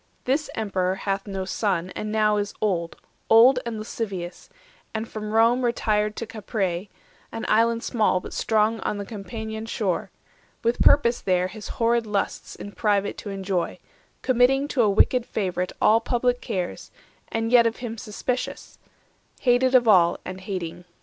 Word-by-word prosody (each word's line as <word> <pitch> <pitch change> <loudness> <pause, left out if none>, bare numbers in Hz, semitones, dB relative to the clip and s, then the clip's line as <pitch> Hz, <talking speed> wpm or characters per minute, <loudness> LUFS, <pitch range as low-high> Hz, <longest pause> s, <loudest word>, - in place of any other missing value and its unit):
This 280 +4 0
Emperor 190 -4 -1
hath 195 +1 -3
no 195 -1 -3
son, 185 -2 -1
and 210 +3 -5
now 215 -1 +2
is 205 0 -3
old, 175 -5 -1
90 - - -35 0.2
Old 245 +3 +7
and 230 -2 -3
lascivious, 195 -5 -5 0.5
and 220 +1 -2
from 215 -1 -6
Rome 230 +3 +4
retired 215 -3 +1
To 230 - -4
Capreae, 200 -4 -3 0.4
an 225 - -5
island 230 +1 +2
small 215 -6 +1
but - - -9
strong 220 0 +1
On 210 - -2
the 200 - -5
Campanian 220 +2 -6
shore, 200 -6 -1 0.5
with 235 +1 0
purpose 240 -4 +5
there 185 -1 +1
His 210 +2 -9
horrid 230 -1 +2
lusts 205 -2 -2
in 205 - -8
private 205 -1 0
to 205 - -7
enjoy; 190 -3 -2 0.5
Committing 260 +2 +3
to 265 - +1
a 215 - +4
wicked 240 +5 +3
favourite 185 -5 -2
All 225 +2 +5
public 245 +1 0
cares, 180 -2 -4 0.4
and 225 0 -2
yet 240 -2 +6
of 225 - -2
him 235 -2 -6
suspicious; 245 +3 -4 0.6
Hated 255 0 +3
of 245 -2 +5
all, 175 -5 +5
and 185 0 -7
hating. 180 -3 -5
215 Hz, 160 wpm, -24 LUFS, 195-230 Hz, 0.6 s, Old